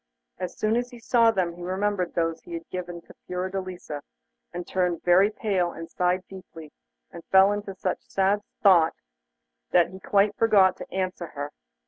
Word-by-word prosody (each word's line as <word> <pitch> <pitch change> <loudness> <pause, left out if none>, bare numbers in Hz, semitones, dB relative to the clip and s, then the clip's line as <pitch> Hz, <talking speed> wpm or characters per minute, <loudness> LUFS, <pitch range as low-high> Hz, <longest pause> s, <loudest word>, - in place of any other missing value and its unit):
As 180 -1 -5
soon 215 +2 +1
as 245 0 -2
he 245 - -12
saw 230 0 +3
them 185 -6 0
he 175 - -12
remembered 185 0 -1
those 165 -1 0
he 175 - -11
had 165 0 -7
given 175 -1 -5
to - - -16
Fiordelisa, 185 -4 -4 0.5
and 175 0 -5
turned 180 -2 -1
very 185 +3 +5
pale 195 -5 -1
and 165 0 -9
sighed 180 +1 0
deeply, 165 -5 -11 0.4
and 170 - -10
fell 190 +1 +6
into 205 -1 -4
such - - -3
sad 195 +2 +2 0.2
thought 170 -5 +6 0.7
that 175 0 +3
he 190 - -10
quite 200 +2 +2
forgot 200 -5 +4
to - - -10
answer 185 -2 -3
her. 145 -1 -6
185 Hz, 170 wpm, -26 LUFS, 175-200 Hz, 0.7 s, fell